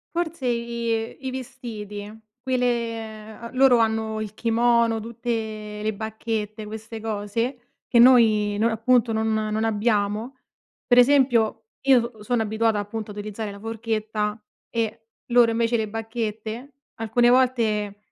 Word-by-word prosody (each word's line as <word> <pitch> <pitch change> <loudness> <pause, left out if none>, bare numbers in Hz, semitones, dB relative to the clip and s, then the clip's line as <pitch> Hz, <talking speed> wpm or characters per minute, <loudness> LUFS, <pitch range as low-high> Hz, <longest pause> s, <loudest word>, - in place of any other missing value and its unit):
Forse 335 -5 -2
i 235 0 -2
i 260 - -2
vestiti. 220 -5 -7 0.2
Qui 260 0 0
le 250 0 +1 0.8
ehm, - - -11
loro 255 -2 +5
hanno 220 -1 0
il 215 -1 -6
kimono 235 0 +2
tutte 220 -2 -4
le 215 +1 0
bacchette, 220 0 -4
queste 220 +1 -7
cose 225 +4 -2 0.3
che - - +2
noi 225 -4 +6
noi 225 +2 +3
appunto 230 +1 +2
non 220 0 0
non 215 0 -1
abbiamo, 215 +2 0 0.5
per 245 0 +5
esempio, 245 -5 +4 0.2
io 245 -3 +5
s - - -11
sono 240 0 +1
abituata 220 0 +1
appunto 210 +1 -4
a - - -7
utilizzare 210 +1 -5
la 200 - -9
forchetta 220 -1 -2 0.3
e 225 -1 -3 0.3
loro 240 -1 +6
invece 230 +1 +1
le 220 -1 -1
bacchette, 225 +3 -5 0.3
alcune 235 +2 +3
volte, 225 -5 +2
225 Hz, 135 wpm, -24 LUFS, 215-240 Hz, 0.8 s, noi